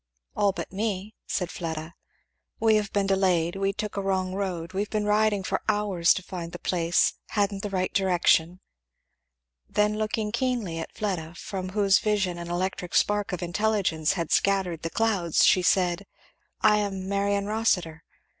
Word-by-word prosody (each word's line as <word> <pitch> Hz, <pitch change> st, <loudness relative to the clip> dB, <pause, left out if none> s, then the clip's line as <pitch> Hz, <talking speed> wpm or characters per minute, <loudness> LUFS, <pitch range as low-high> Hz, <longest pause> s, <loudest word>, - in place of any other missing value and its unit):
"All 200 Hz, -1 st, +3 dB
but -, -, -6 dB
me," 205 Hz, 0 st, -2 dB
said 180 Hz, -2 st, -2 dB
Fleda. 160 Hz, -1 st, -5 dB, 0.7 s
"We 220 Hz, -1 st, +4 dB
have 210 Hz, -1 st, -2 dB
been 200 Hz, -1 st, +1 dB
delayed 185 Hz, -3 st, +2 dB
we 195 Hz, 0 st, 0 dB
took 210 Hz, +1 st, -5 dB
a -, -, 0 dB
wrong 190 Hz, -1 st, -1 dB
road 185 Hz, -3 st, -3 dB
we've 200 Hz, +2 st, -2 dB
been 210 Hz, -1 st, -1 dB
riding 210 Hz, -1 st, +2 dB
for -, -, -1 dB
hours 205 Hz, -5 st, +2 dB
to 190 Hz, -, -4 dB
find 175 Hz, -3 st, -7 dB
the -, -, -5 dB
place 170 Hz, -1 st, +1 dB
hadn't 200 Hz, -2 st, 0 dB
the 205 Hz, -, -4 dB
right 185 Hz, -1 st, -1 dB
direction." 180 Hz, -2 st, +2 dB, 1.1 s
Then 210 Hz, +1 st, +1 dB
looking 215 Hz, 0 st, -1 dB
keenly 235 Hz, -8 st, -1 dB
at 165 Hz, -, -6 dB
Fleda, 175 Hz, -6 st, -3 dB
from 185 Hz, 0 st, -5 dB
whose 200 Hz, 0 st, +3 dB
vision 195 Hz, -5 st, 0 dB
an 170 Hz, 0 st, -6 dB
electric 180 Hz, +1 st, -3 dB
spark 205 Hz, -1 st, +2 dB
of 180 Hz, -2 st, -3 dB
intelligence 175 Hz, -4 st, +1 dB
had 170 Hz, -4 st, -3 dB
scattered 190 Hz, -5 st, +1 dB
the 165 Hz, -, -3 dB
clouds, 195 Hz, -6 st, +2 dB
she 185 Hz, -, +5 dB
said; 180 Hz, +1 st, +1 dB, 0.5 s
"I 210 Hz, -1 st, +5 dB
am 195 Hz, -2 st, -3 dB
Marion 200 Hz, 0 st, 0 dB
Rossitur." 195 Hz, -7 st, 0 dB
195 Hz, 165 wpm, -26 LUFS, 175-210 Hz, 1.1 s, she